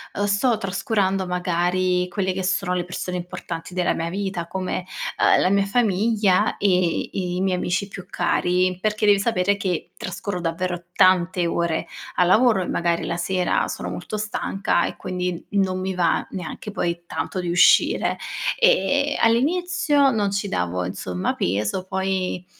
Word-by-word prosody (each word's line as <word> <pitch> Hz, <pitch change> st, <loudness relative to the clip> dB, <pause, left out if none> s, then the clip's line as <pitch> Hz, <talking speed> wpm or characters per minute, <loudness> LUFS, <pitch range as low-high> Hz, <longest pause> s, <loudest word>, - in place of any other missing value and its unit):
uhm, 205 Hz, -, 0 dB
sto 205 Hz, +4 st, +2 dB
trascurando 195 Hz, -1 st, 0 dB
magari 180 Hz, 0 st, 0 dB
quelle 190 Hz, +1 st, -1 dB
che 190 Hz, +1 st, -3 dB
sono 190 Hz, 0 st, 0 dB
le 180 Hz, -, -1 dB
persone 180 Hz, 0 st, -4 dB
importanti 175 Hz, -1 st, -6 dB
della 180 Hz, -1 st, +1 dB
mia 165 Hz, 0 st, -2 dB
vita, 190 Hz, -3 st, -3 dB
come, 185 Hz, 0 st, -3 dB, 0.3 s
uhm, -, -, +5 dB
la 185 Hz, -, +3 dB
mia 200 Hz, 0 st, +3 dB
famiglia 210 Hz, -2 st, +2 dB
e 180 Hz, -4 st, +1 dB
i 180 Hz, -1 st, -2 dB
miei 190 Hz, -1 st, +1 dB
amici 185 Hz, +3 st, -1 dB
più 195 Hz, -2 st, -9 dB
cari. 180 Hz, 0 st, +1 dB
Perché 210 Hz, +1 st, 0 dB
devi 205 Hz, -1 st, +5 dB
sapere 200 Hz, -2 st, +1 dB
che 185 Hz, -4 st, -3 dB
trascorro 185 Hz, +1 st, -4 dB
davvero 175 Hz, +1 st, -2 dB
tante 185 Hz, -2 st, +3 dB
ore 170 Hz, -1 st, -1 dB, 0.3 s
al 180 Hz, -, +4 dB
lavoro 220 Hz, 0 st, +4 dB
e 180 Hz, -, -3 dB
magari 170 Hz, 0 st, 0 dB
la 170 Hz, -, -2 dB
sera 180 Hz, +1 st, 0 dB
sono -, -, -5 dB
molto 215 Hz, -, -5 dB
stanca 210 Hz, -2 st, -1 dB
e -, -, -4 dB
quindi, 180 Hz, -2 st, -4 dB
non 190 Hz, -2 st, +1 dB
mi 190 Hz, 0 st, -3 dB
va 175 Hz, -2 st, +2 dB
neanche 185 Hz, +3 st, -6 dB
poi 170 Hz, -4 st, -2 dB
tanto 185 Hz, -, -3 dB
di 175 Hz, -, -3 dB
uscire. 175 Hz, +1 st, +4 dB, 0.4 s
Ehm, 290 Hz, -, +3 dB
all'inizio 290 Hz, +3 st, +3 dB
non 210 Hz, -4 st, +1 dB
ci 200 Hz, +1 st, -1 dB
davo, 90 Hz, -, -1 dB
insomma, 90 Hz, 0 st, -3 dB
peso. 105 Hz, -, -1 dB
Poi, 190 Hz, -1 st, -2 dB
185 Hz, 155 wpm, -23 LUFS, 180-200 Hz, 0.4 s, uhm